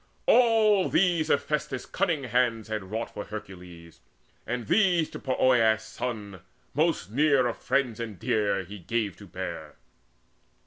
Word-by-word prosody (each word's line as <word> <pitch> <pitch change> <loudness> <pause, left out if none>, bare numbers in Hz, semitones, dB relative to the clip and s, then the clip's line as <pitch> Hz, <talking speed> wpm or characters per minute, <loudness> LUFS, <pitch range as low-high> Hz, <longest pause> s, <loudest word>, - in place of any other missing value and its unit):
All 220 -5 +4
these 175 -4 +2
Hephaestus' 150 -3 -1
cunning 165 -7 -1
hands 120 -2 0
had 110 -3 -3
wrought 110 +4 -4
For 105 - -5
Hercules; 90 -5 -10 0.5
and 120 -1 -3
these 175 - +2
to - - -7
Poeas' 120 -4 +2
son, 110 -3 -6 0.3
Most 150 - 0
near 140 0 +3
of 120 - -1
friends 125 -5 0
and 110 -4 -5
dear, 105 -4 0
he 100 +3 -10
gave 105 +1 -2
to - - -13
bear. - - -6
120 Hz, 135 wpm, -27 LUFS, 105-150 Hz, 0.5 s, All